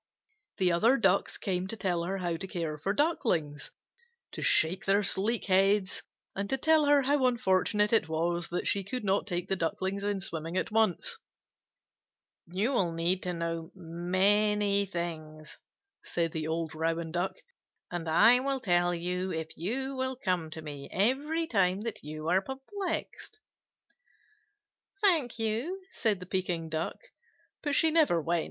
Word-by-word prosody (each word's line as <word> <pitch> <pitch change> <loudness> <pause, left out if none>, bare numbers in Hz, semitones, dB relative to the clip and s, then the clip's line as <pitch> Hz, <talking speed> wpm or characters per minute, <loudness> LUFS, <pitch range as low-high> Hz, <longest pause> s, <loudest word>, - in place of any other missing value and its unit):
The 185 -3 +3
other 225 +10 +4
Ducks 195 -4 +2
came 185 -1 -2
to 225 - -5
tell 180 -4 0
her 195 +2 -2
how 175 -3 -2
to 190 +4 -5
care 165 -5 -4
for 195 - -1
the 255 +8 +3
Ducklings, 165 - -1 0.6
to - - -7
shake 165 +4 +2
their 200 +2 +3
sleek 210 +5 0
heads, 195 0 +2 0.3
and 200 +1 -3
to 270 - +1
tell 315 +2 +4
her 290 -1 +5
how 275 -1 +3
unfortunate 210 -2 +2
it 190 -8 +3
was 170 +2 -1
that 175 - -2
she 200 - +1
could 250 +6 -5
not 195 0 +1
take 175 -1 -2
the 195 - 0
Ducklings 190 +3 -2
in 205 -1 -1
swimming 165 -2 -4
at - - -1
once. 220 -5 +1 1.3
"You 195 +9 0
will 190 -10 +1
need 170 +3 0
to 180 - -2
know 165 -1 -3
many 200 +4 +2
things," 155 -4 -6 0.4
said 165 -1 -1
the 155 -1 -3
old 160 -1 -2
Rouen 165 +1 -2
Duck, 175 +3 -1 0.6
"and 170 -2 -3
I 230 +10 +7
will 270 +1 -1
tell 175 -5 +2
you 180 +2 -2
if 160 0 -5
you 265 - -3
will 260 0 -2
come 180 -9 -1
to 160 0 -8
me 145 -2 -8
every 285 - +1
time 195 - +1
that 230 0 -5
you 155 +1 -6
are 185 +3 +3
perplexed." 365 - -5 1.7
"Thank 320 - +3
you," 230 - -1
said 215 -5 0
the 180 - -8
Pekin 175 -3 -2
Duck. 160 +1 -2 0.6
But 290 -2 -1
she 320 +2 +4
never 305 - +4
went. 170 +2 0
190 Hz, 160 wpm, -30 LUFS, 170-225 Hz, 1.7 s, I